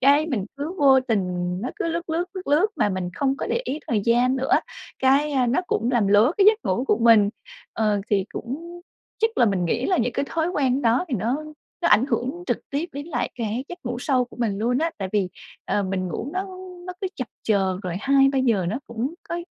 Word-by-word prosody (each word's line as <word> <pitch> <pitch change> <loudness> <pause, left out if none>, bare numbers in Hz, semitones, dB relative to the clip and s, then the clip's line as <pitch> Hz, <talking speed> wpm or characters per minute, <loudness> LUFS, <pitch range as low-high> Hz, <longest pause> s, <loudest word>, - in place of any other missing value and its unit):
cái 285 +3 +5
mình 225 -11 -2
cứ 305 +6 -4
vô 270 -2 +6
tình 225 -5 0 0.4
nó 250 - -3
cứ - - -2
lướt, 335 0 -3
lướt, 335 +2 0
lướt, 370 - -6
lướt 305 +8 +4
mà - - +2
mình 185 -2 -3
không 275 -1 0
có - - -3
để 475 - 0
ý 295 - -3
thời 220 -3 +1
gian 245 +3 +3
nữa, 265 +1 -1 0.5
cái, 275 +3 +3
a, 260 -3 +2
nó 260 +9 +2
cũng 235 +3 0
làm 235 -5 +2
lố 210 +8 +5
cái 400 0 +4
giấc 430 +1 +6
ngủ 190 +8 0
của 210 -4 +2
mình. 225 -3 +6 0.4
Ờ, 210 -2 +1
thì 195 -2 +2
cũng 335 +8 -6 0.4
chắc 450 0 0
là - - +6
mình 190 -3 +1
nghĩ 235 +9 0
là 375 - +2
những 240 +1 0
cái - - -1
thói 330 +1 0
quen 275 -5 +1
đó 235 +8 +3
thì 255 - -1
nó 240 +9 -1 0.4
nó - - +3
ảnh 215 +6 +5
hưởng 290 +6 -2
trực - - 0
tiếp 295 +5 -2
đến 285 +3 -6
lại 270 -8 -2
cái 235 +2 -3
giấc 355 0 -7
ngủ 240 0 -3
sâu 255 -1 +1
của 245 - -16
mình 215 -5 -1
luôn 245 +4 +1
á. 330 +1 +1
Tại 190 - -3
vì, 200 -3 +1 0.4
ờ, 205 - 0
mình 185 -1 -2
ngủ 245 - -4
nó 370 +1 -1 0.4
nó 365 - -4
cứ 385 - -1
chập 255 -4 -4
chờn 195 -3 +1
rồi 180 -2 -3
2:00-3:00 270 -7 +3
nó 225 +7 -2
cũng 235 +7 -3
có 340 - -2
255 Hz, 235 wpm, -24 LUFS, 215-295 Hz, 0.5 s, vô